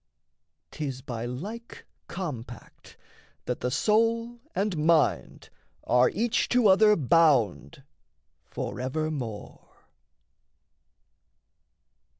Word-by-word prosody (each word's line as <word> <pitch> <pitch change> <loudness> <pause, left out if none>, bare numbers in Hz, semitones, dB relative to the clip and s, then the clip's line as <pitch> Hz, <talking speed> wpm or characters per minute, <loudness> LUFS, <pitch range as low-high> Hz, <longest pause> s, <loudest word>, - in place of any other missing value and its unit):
'Tis 135 -4 -5
by 120 -3 -5
like 205 - -8 0.2
compact 130 - -8 0.5
that 125 - -3
the 125 - -2
soul 230 - +1 0.2
and 200 -1 -1
mind 155 0 +1 0.3
Are 125 0 +3
each 225 +4 -1
to 245 -2 +2
other 210 +2 +5
bound 135 - +2 0.6
forevermore. 130 -5 -5
155 Hz, 75 wpm, -27 LUFS, 125-210 Hz, 0.6 s, other